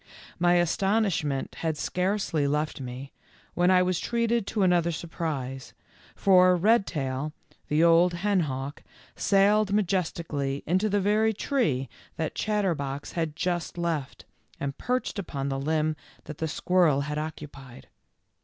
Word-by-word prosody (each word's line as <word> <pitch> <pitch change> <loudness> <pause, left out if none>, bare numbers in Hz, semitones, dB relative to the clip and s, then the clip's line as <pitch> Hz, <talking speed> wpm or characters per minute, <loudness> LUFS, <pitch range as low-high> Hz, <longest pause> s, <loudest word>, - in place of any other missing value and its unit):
My 175 0 +4
astonishment 175 -4 0
had 160 -2 -1
scarcely 180 -5 0
left 150 0 -1
me, 130 +2 -7 0.4
when 175 +1 +2
I 185 -1 +5
was 180 -1 0
treated 235 -2 0
to 210 - 0
another 175 -2 +3
surprise, 145 -5 -5 0.4
for 185 -2 +5
Redtail, 155 - +1 0.3
the 150 +2 +2
old 170 +1 +5
henhawk, 155 -8 -1 0.3
sailed 200 +1 +3
majestically 165 -8 -1
into 185 +6 +1
the 205 0 +2
very 215 +3 +2
tree 205 - 0 0.3
that 160 -2 -3
Chatterbox 165 -10 -2
had 160 -3 -2
just 175 0 -2
left 165 -6 -3 0.3
and 140 -1 -3
perched 250 -4 -2
upon 140 -7 -4
the 135 0 -2
limb 155 +2 0 0.3
that 150 - -9
the 160 - -1
squirrel 160 -3 +2
had 150 +1 -3
occupied. 145 -5 -8
170 Hz, 125 wpm, -27 LUFS, 145-195 Hz, 0.4 s, I